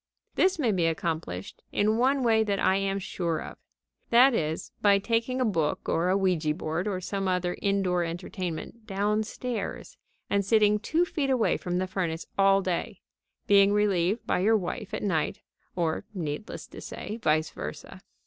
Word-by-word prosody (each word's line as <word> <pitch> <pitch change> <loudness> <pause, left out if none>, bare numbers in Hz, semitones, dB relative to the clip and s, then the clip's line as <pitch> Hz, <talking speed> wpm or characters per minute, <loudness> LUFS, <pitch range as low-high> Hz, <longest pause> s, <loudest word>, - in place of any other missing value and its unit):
This 375 -1 +3
may 255 -8 +2
be 175 -4 +2
accomplished 160 - -3
in 215 +1 +2
one 260 +3 +2
way 220 -2 +4
that 200 -2 0
I 190 - +3
am 195 0 0
sure 175 -4 -2
of. - - -9 0.5
That 250 +3 +6
is, 160 -7 -2
by 200 -1 +5
taking 230 +5 0
a 255 - +2
book, 165 -9 -1
or 170 +2 +1
a 190 - +3
ouija 170 -6 +1
board, 165 +2 -2
or 190 -3 -1
some 195 +1 -3
other 180 -1 0
indoor 195 -3 +1
entertainment 175 +5 -5
downstairs 215 - -2 0.3
and 200 0 +1
sitting 210 0 +4
two 320 +10 +1
feet 290 -5 -2
away 255 -4 +2
from 180 -1 -2
the 185 - 0
furnace 175 -3 -3
all 195 0 +4
day, 185 +2 -3 0.4
being 200 0 +5
relieved 205 0 +1
by - - +1
your 220 +4 +4
wife 180 -4 -5
at - - -4
night 165 -7 -1 0.3
(or, 165 -3 -1
needless 165 +4 -5
to - - -10
say, 215 +3 -6
vice 155 -3 +2
versa). - - -8
195 Hz, 170 wpm, -27 LUFS, 175-220 Hz, 0.5 s, That